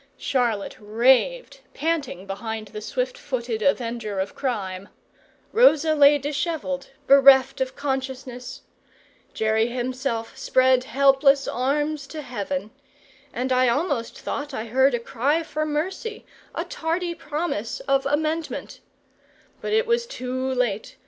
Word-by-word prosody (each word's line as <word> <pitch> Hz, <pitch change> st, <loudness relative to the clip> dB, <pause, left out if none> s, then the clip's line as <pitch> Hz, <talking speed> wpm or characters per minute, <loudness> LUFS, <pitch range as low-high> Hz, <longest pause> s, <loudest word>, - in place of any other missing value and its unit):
Charlotte 235 Hz, -6 st, -1 dB
raved, 255 Hz, -, +2 dB, 0.2 s
panting 295 Hz, -, -2 dB
behind 215 Hz, +2 st, -5 dB
the 210 Hz, -, -7 dB
swift 250 Hz, +3 st, -3 dB
footed 240 Hz, -5 st, -3 dB
avenger 230 Hz, -5 st, -1 dB
of 190 Hz, -, -2 dB
crime; 200 Hz, -7 st, -3 dB, 0.6 s
Rosa 325 Hz, -, +5 dB
lay 290 Hz, -1 st, +6 dB
dishevelled, 285 Hz, -1 st, -3 dB, 0.2 s
bereft 270 Hz, -1 st, +6 dB
of 260 Hz, 0 st, -2 dB
consciousness; 265 Hz, -2 st, -4 dB, 0.7 s
Jerry 220 Hz, +1 st, +2 dB
himself 245 Hz, -1 st, -3 dB
spread 255 Hz, -1 st, +3 dB
helpless 275 Hz, +1 st, +4 dB
arms 285 Hz, +3 st, -1 dB
to 305 Hz, 0 st, -7 dB
heaven, 200 Hz, -5 st, -4 dB, 0.6 s
and 255 Hz, +2 st, -3 dB
I 255 Hz, -1 st, +4 dB
almost 280 Hz, -3 st, -1 dB
thought 285 Hz, -1 st, -4 dB
I 220 Hz, -, -3 dB
heard 265 Hz, +3 st, +3 dB
a -, -, -2 dB
cry 275 Hz, +7 st, 0 dB
for 310 Hz, -1 st, -3 dB
mercy, 375 Hz, +9 st, -3 dB, 0.3 s
a -, -, -2 dB
tardy 340 Hz, +2 st, -2 dB
promise 300 Hz, -9 st, -3 dB
of 275 Hz, 0 st, +1 dB
amendment; 310 Hz, +3 st, -2 dB, 0.8 s
but -, -, -3 dB
it 445 Hz, +2 st, +3 dB
was 470 Hz, 0 st, +1 dB
too 260 Hz, -, -3 dB
late. 220 Hz, -5 st, -2 dB
265 Hz, 120 wpm, -24 LUFS, 235-295 Hz, 0.8 s, lay